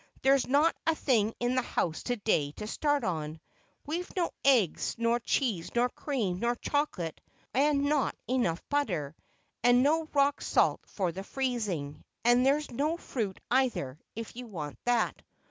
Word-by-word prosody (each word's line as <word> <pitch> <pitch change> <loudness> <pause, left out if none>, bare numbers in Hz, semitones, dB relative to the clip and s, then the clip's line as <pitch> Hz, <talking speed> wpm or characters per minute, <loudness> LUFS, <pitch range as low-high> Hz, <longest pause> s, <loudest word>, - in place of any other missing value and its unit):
There's 270 0 +4
not 290 +5 +3
a 325 - +4
thing 225 -7 +1
in 245 +1 +1
the 255 - +2
house 165 -8 -1
to 245 - 0
day 160 -10 0
to 210 - -7
start 290 +5 0
on. 155 -4 -3 0.5
We've 340 +4 -3
no 350 -3 0
eggs, 245 - +3
nor 230 +1 +2
cheese, 230 -7 0
nor 245 +1 +3
cream, 225 -11 -2
nor 235 +2 +1
chocolate, 240 - -2 0.3
and 280 +2 +3
not 285 -1 +1
enough 235 -9 0
butter, 180 - -1 0.5
and 245 +1 +6
no 320 +3 +3
rock 280 0 +2
salt - - +2
for 185 -4 -1
the 190 +3 -6
freezing, 205 - -3 0.2
and 240 +1 +5
there's 285 +2 +2
no 300 +7 0
fruit 220 - -4
either, 240 - +1 0.2
if 230 0 -6
you 250 0 -7
want 155 -9 -6
that." 240 -1 +1
245 Hz, 160 wpm, -30 LUFS, 190-280 Hz, 0.5 s, and